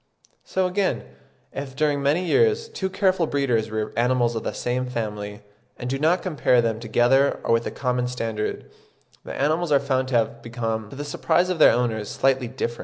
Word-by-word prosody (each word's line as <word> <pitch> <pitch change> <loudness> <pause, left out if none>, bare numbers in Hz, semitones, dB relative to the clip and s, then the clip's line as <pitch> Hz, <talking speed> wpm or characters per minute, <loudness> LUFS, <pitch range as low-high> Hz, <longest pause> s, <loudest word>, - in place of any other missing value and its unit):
So 190 0 -1
again, 185 - 0 0.5
if 135 -1 -6
during 145 -1 +1
many 150 +6 +1
years 455 - +2
two 190 - -3
careful 185 -3 +1
breeders 125 -7 0
rear 110 0 -3
animals 120 -1 +2
of 115 - -3
the - - -2
same 125 +1 -2
family, 105 -4 -4 0.4
and 125 0 -4
do 135 - -1
not 165 +5 +2
compare 150 -8 +2
them 115 -2 0
together 120 +4 +2
or - - +2
with 115 0 +1
a - - -4
common 125 -2 -1
standard, 115 -3 -4 0.5
the - - -7
animals 155 +4 +1
are 140 - +5
found 130 -1 0
to 130 - -2
have 115 0 0
become, 115 -2 -3
to - - -10
the 145 +2 -5
surprise 175 +4 +1
of 180 - -3
their - - +8
owners, 110 -4 -1
slightly 130 -2 +1
different. 120 -1 -4
130 Hz, 190 wpm, -24 LUFS, 115-150 Hz, 0.5 s, their